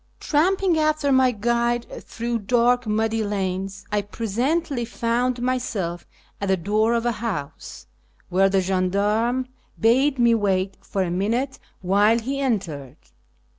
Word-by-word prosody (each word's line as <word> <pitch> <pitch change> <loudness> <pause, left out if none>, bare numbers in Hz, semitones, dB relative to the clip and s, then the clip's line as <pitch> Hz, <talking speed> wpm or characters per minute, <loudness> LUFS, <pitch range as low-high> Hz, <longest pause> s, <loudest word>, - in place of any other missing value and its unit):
Tramping 355 +2 +2
after 305 -2 +1
my 260 -1 +5
guide 235 +1 0 0.2
through 235 0 -3
dark 245 +2 +2
muddy 220 +1 0
lanes, 195 -1 -3
I 210 0 +1
presently 240 - -1
found 240 +2 -1
myself 215 -9 -2 0.3
at 200 - -1
the 190 0 +2
door 215 +6 +1
of 235 0 -1
a 240 - +2
house, 210 -11 -6 0.4
where 190 +2 +3
the 195 0 +2
gendarme 205 +7 0 0.3
bade 260 +5 +3
me 235 -1 +4
wait 195 -3 0
for 195 - -1
a 175 - -3
minute 230 +9 -1 0.2
while 205 +4 +3
he 265 +4 -3
entered. 165 - -2
225 Hz, 130 wpm, -23 LUFS, 195-245 Hz, 0.4 s, my